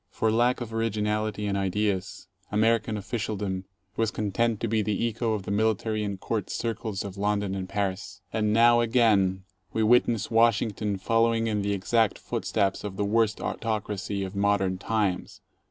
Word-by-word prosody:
For 110 - 0
lack 120 +3 +2
of 115 -2 -5
originality 110 -1 -1
and 100 -1 -1
ideas, 100 0 -1 0.3
American 110 +1 +2
official 105 +1 -3
dom 95 -2 -3 0.3
was 115 -1 +1
content 110 +2 0
to 115 - 0
be 110 0 +1
the 105 +2 0
echo 115 0 -1
of 105 -3 -3
the 100 - -5
military 110 +1 0
and 100 -2 -4
court 110 0 -3
circles 110 -3 -3
of 100 -1 -7
London 105 -1 0
and 95 -1 -4
Paris. 100 -1 -3
And 105 -1 +1
now 120 +2 +6
again 105 -6 +3 0.3
we 110 - +1
witness 115 -1 +3
Washington 110 -3 +2
fol 115 +4 +2
lowing 115 -1 +1
in 105 -2 0
the 100 0 0
exact 110 +2 +1
footsteps 95 -1 -1
of 100 -2 -5
the 100 - 0
worst 110 +1 +2
autocracy 105 -3 -3
of 95 +1 -6
modern 100 -2 +1
times. 105 -4 -1
105 Hz, 170 wpm, -27 LUFS, 100-115 Hz, 0.3 s, now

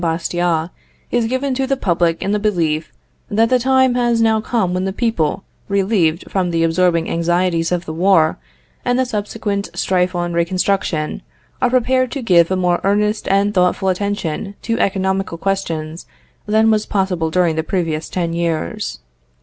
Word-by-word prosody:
Bastiat, 170 0 -1 0.4
is 240 -1 +1
given 260 +3 -1
to 265 +1 -1
the 275 0 0
public 170 -6 0
in 195 - -1
the 210 - +1
belief 165 -7 0 0.4
that 225 +2 +2
the 255 - +3
time 260 0 +3
has 240 -1 +1
now 220 -1 +3
come 215 -6 0
when 185 +1 -1
the 190 - -1
people, 195 -6 -1 0.3
relieved 190 -5 +1
from 185 -2 -1
the 165 -1 +1
absorbing 170 0 +2
anxieties 170 0 0
of 175 -1 -1
the 160 - -5
war, 165 -2 +3 0.4
and 245 0 +1
the 260 - +2
subsequent 205 -3 -3
strife 180 -1 0
on 175 0 -2
reconstruction, 170 -2 0 0.4
are 250 - +3
prepared 255 +1 +2
to 275 - -4
give 170 -6 +4
a 190 - +1
more 180 -1 +1
earnest 210 +2 +1
and 200 +1 +2
thoughtful 185 0 +2
attention 200 0 -2
to 230 0 -1
economical 190 -2 0
questions 165 -4 -3 0.4
than 220 +1 +3
was 215 -1 +1
possible 185 -5 0
during 170 -1 +1
the 160 - 0
previous 165 -2 -2
ten 170 -2 -2
years. 165 - -2
190 Hz, 165 wpm, -18 LUFS, 170-215 Hz, 0.4 s, give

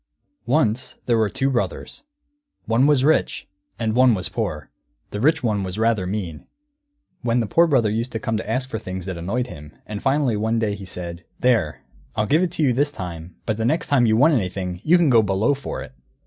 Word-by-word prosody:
] - - -50
Once 130 -3 +1
there 120 - +2
were 110 -2 +2
two 135 +7 0
brothers. 125 - -3 0.6
One 115 +5 +3
was 145 -3 +3
rich, 155 +3 +1 0.3
and 110 -2 -1
one 125 -1 +5
was 90 -2 -2
poor; 90 - -4 0.4
the 105 - -4
rich 155 +3 +3
one 105 -4 +1
was 95 0 -4
rather 110 -4 +1
mean. 90 -6 -5 0.7
When 120 0 +1
the 115 - +1
Poor 170 - +4
Brother 120 -9 +2
used 115 +3 -2
to 110 - -2
come 110 +1 -2
to 110 - -5
ask 125 +3 -1
for 110 -4 -4
things 95 -2 -6
it 95 - -3
annoyed 100 +9 -2
him, 75 -10 -11
and 105 -1 -6
finally 135 -3 +1
one 110 +2 0
day 110 -2 0
he 100 -1 -8
said, 90 -1 -6 0.2
"There, 105 - +1 0.3
I'll 110 -1 +1
give 155 +8 +3
it 185 - +1
to 160 - 0
you 130 -4 +3
this 145 +4 +1
time, 85 - -7
but 110 -2 -1
the 110 - -2
next 160 +7 0
time 125 -5 +4
you 110 0 +3
want 150 +6 +5
anything, 90 -5 -2
you 175 +3 +5
can 165 -6 +3
go 115 -2 +6
Below 105 +6 +1
for 140 0 -5
it!" 65 - -13
110 Hz, 220 wpm, -22 LUFS, 95-130 Hz, 0.7 s, go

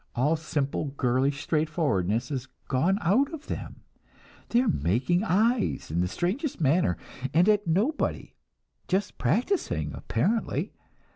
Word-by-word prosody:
All 145 +7 +2
simple, 155 -2 -2
girlish 135 +3 +1
straightforwardness 145 - 0
is 130 -2 -3 0.2
gone 165 +9 +2
out 250 - +3
of 310 -1 -12
them; - - -6 0.7
they 235 - +4
are 255 - 0
making 125 - +1
eyes, 225 - +1
in 85 +2 +1
the 90 - +1
strangest 195 - -2
manner 145 - +2 0.4
and 175 +4 +5
at 210 -2 +3
nobody; 215 - 0 0.5
just 195 +2 -1
practicing, 345 - 0
apparently. 225 +1 -1
165 Hz, 125 wpm, -27 LUFS, 130-210 Hz, 0.7 s, and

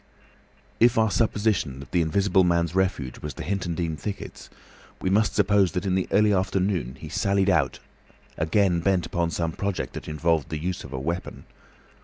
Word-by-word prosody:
If 120 0 +5
our 110 -2 +3
supposition 105 - 0
that 70 - -11
the 90 - +2
Invisible 95 +4 +2
Man's 85 -1 +1
refuge 90 -9 -1
was 75 - -6
the - - -6
Hintondean 85 -4 -2
thickets, 100 +5 -7
then - - -26 0.4
we 95 - -1
must 105 +2 +2
suppose 100 -2 +3
that 90 0 -2
in 95 - +1
the 95 0 0
early 105 +1 +4
afternoon 95 -7 0
he 80 - -8
sallied 100 +4 +1
out 75 -6 +1 0.6
again 90 +2 +2
bent 90 0 +1
upon 85 -2 -1
some 85 0 -2
project 100 +3 -3
that - - -7
involved 80 0 0
the 80 - -3
use 90 +4 -3
of 70 - -10
a 65 - -4
weapon. 85 +6 -4
90 Hz, 180 wpm, -25 LUFS, 80-100 Hz, 0.6 s, If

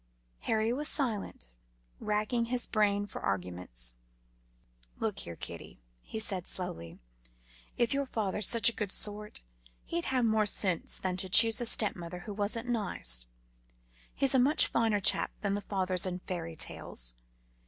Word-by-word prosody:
Harry 220 +1 0
was 295 +4 -2
silent, 225 - -2 0.5
racking 215 +3 -1
his 245 +1 0
brain 205 -2 +1
for 205 - -9
arguments. 90 -11 -3 1.0
"Look - - -2
here, 85 - -7
kiddie," - - -9 0.2
he - - -7
said 195 -5 +1
slowly, 85 - -4 0.8
"if 240 +1 +2
your 280 0 -1
father's 210 -4 0
such 230 -2 +6
a 235 - +6
good 210 -4 -4
sort, 210 +1 -2 0.4
he'd 340 0 -3
have 255 -2 +1
more 220 -1 +2
sense 185 -4 0
than 185 -1 -3
to 190 0 -2
choose 225 +4 +8
a 240 - +1
stepmother 180 -6 0
who 210 +2 -7
wasn't 215 +4 -2
nice. 120 - -1 0.9
He's 275 0 +3
a 260 - +4
much 280 +5 +4
finer 225 -3 +1
chap - - +4
than 200 -1 0
the 205 - -2
fathers 185 -2 +1
in 180 -1 -3
fairy 165 -3 -5
tales. - - -2
205 Hz, 150 wpm, -30 LUFS, 180-230 Hz, 1.0 s, choose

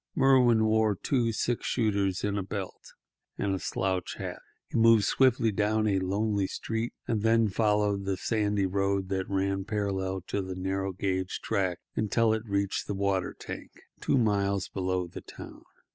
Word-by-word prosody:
Merwin 125 -5 +5
wore 110 -1 +3
two 120 +3 0
six 120 +2 -1
shooters 100 -5 0
in 105 -1 0
a 100 - 0
belt, 95 0 -6 0.4
and 100 - 0
a 95 - -1
slouch 95 -1 -2
hat. - - -5 0.3
He - - -6
moved 115 -2 +6
swiftly 120 0 +3
down 110 +2 +1
a 100 -3 +2
lonely 100 +1 0
street, 115 +4 -3
and 110 -3 0
then 115 0 +3
followed 105 -1 +1
the 95 -1 -1
sandy 105 -1 0
road 95 0 0
that 95 -1 -2
ran 95 0 0
parallel 95 -2 -2
to 100 +3 -3
the 95 -1 -5
narrow 95 +1 -2
gauge 95 0 -2
track 95 -4 -1
until 110 +1 +2
he 110 - 0
reached 100 -3 -2
the 100 - -2
water 95 -2 0
tank, - - -8 0.3
two - - +1
miles 100 -4 +1
below 95 -1 -1
the 85 - -9
town. - - -11
100 Hz, 165 wpm, -28 LUFS, 95-110 Hz, 0.4 s, moved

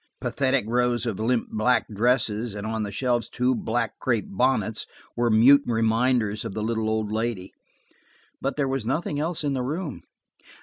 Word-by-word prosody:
Pathetic 135 -3 0
rows 125 +1 +1
of 110 -5 -3
limp 115 +2 0
black 110 +4 +2
dresses 110 0 0
and 100 0 -5
on 110 0 -2
the 105 -1 -3
shelves 120 -1 0
two 125 +1 +1
black 115 -2 -2
crepe 115 -5 0
bonnets 110 0 0 0.3
were 120 0 +1
mute 125 +6 +7
reminders 115 -1 +1
of - - -6
the 105 - -2
little 110 -1 -1
old 110 -1 -1
lady. 110 -4 -3 0.9
But 135 - -1
there 140 -2 0
was 135 -4 -2
nothing 145 +2 -1
else 160 +1 -2
in 145 -1 0
the 130 - -1
room. 150 +3 -4
120 Hz, 170 wpm, -25 LUFS, 110-130 Hz, 0.9 s, mute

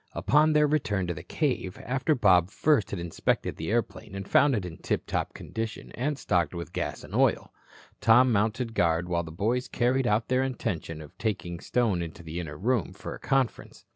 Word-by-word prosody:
Upon 155 +2 +3
their 150 0 +5
return 105 -11 0
to 85 - -2
the 75 - -8
cave, 95 - -2
after 135 +5 +1
Bob 95 -7 +4
first 140 - +2
had 100 - -4
inspected 85 -1 -1
the 80 - -4
airplane 110 -2 -2
and 95 0 -5
found 140 -2 +4
it 100 -4 -2
in 85 -2 -7
tiptop - - -2
condition 110 0 -5
and 145 +4 -2
stocked 90 - 0
with 85 0 -6
gas - - -3
and - - -11
oil, - - +2 0.5
Tom 125 +3 +5
mounted 115 +3 0
guard 85 -3 +1
while 85 -1 0
the 80 -2 -8
boys 115 +9 -1
carried 125 +1 +1
out 110 +1 +1
their 130 0 +2
intention 90 -11 -3
of 75 - -15
taking 90 -5 -2
Stone 110 -7 +1
into 85 0 -7
the 80 +1 -5
inner 75 -4 -6
room 115 - 0
for - - -7
a - - -9
conference. 135 -3 -1
105 Hz, 195 wpm, -27 LUFS, 85-125 Hz, 0.5 s, their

